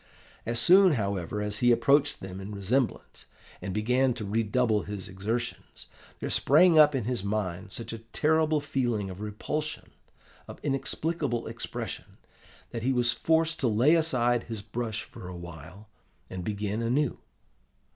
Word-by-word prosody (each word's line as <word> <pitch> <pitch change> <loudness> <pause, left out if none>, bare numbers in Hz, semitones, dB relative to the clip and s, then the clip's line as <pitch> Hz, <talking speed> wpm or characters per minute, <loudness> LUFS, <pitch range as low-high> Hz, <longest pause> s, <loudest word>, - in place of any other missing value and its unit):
As 115 0 0
soon, 185 +7 +6
however, 100 - -2
as 105 0 -2
he 120 0 +4
approached 140 +4 +3
them 95 0 -7
in 100 +2 -7
resemblance, 115 +6 -2 0.3
and 95 - -4
began 125 +5 +1
to 110 -4 -5
redouble 110 +1 +1
his 105 -1 -6
exertions, 110 +5 -4 0.3
there - - -3
sprang 160 +3 +5
up 150 -1 +7
in 130 - 0
his 120 -3 -2
mind 100 -2 -3
such 115 +2 -6
a 115 - -6
terrible 155 +6 +1
feeling 120 -9 -1
of 95 +2 -9
repulsion, 150 +9 -4 0.6
of - - -10
inexplicable 140 -1 -2
expression, - - -6 0.5
that 115 - -4
he 130 +3 +1
was 120 -1 +2
forced 160 +2 +1
to 135 - +1
lay 120 +8 +4
aside 125 -8 +2
his 110 -3 -6
brush 115 -1 -3
for 90 - -11
a 90 -1 -7
while 85 +4 -11 0.4
and 95 -1 -5
begin 105 +2 -2
anew. 125 +4 0
115 Hz, 150 wpm, -28 LUFS, 105-135 Hz, 0.6 s, up